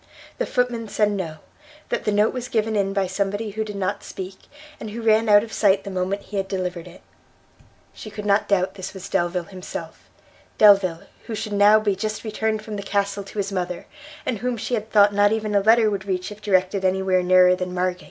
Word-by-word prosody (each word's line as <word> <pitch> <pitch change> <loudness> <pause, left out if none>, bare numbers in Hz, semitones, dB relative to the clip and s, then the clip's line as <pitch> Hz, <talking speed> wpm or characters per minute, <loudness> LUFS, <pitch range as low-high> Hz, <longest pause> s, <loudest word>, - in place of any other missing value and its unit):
The - - -1
footman 245 -3 -1
said 210 0 +1
no; 175 -6 -4 0.5
that - - -2
the 210 - +2
note 210 +1 +2
was 250 -1 -4
given 220 -3 0
in 195 -1 +1
by 195 -1 0
somebody 200 +3 -2
who 220 +2 -2
did 210 -1 -7
not 190 -2 -2
speak, 190 0 -8 0.4
and 220 - -6
who 230 +3 -6
ran 220 0 +3
out 205 0 +7
of 225 -2 -9
sight 195 -2 +3
the 200 - -6
moment 190 +2 -2
he 205 - -6
had 195 0 -1
delivered 180 -2 -4
it. 175 +1 -14 0.9
She 215 - -9
could 210 0 -7
not 200 +1 +2
doubt 190 -2 +1
this 190 0 -8
was 190 0 -7
Delvile 175 -1 0
himself, 185 0 -9 0.5
Delvile 195 -5 +5 0.2
who 225 - -4
should 210 0 -4
now 205 +1 +6
be 205 -2 0
just 215 +2 -4
returned 220 0 -2
from 215 -1 -6
the - - -4
castle 200 0 -1
to 200 - -12
his 200 0 -1
mother, 180 -2 -3 0.4
and 230 -5 -2
whom 245 +1 -2
she 235 - -4
had 220 -2 -2
thought 205 -1 +5
not 205 0 +4
even 220 -1 -1
a 200 - +4
letter 220 +1 +4
would 195 -2 -3
reach 185 +1 -2
if 210 0 -11
directed 190 -1 +1
any 190 0 +1
where 185 -1 +2
nearer 180 0 +5
than 180 0 -4
Margate! 180 0 -1
200 Hz, 220 wpm, -23 LUFS, 185-215 Hz, 0.9 s, out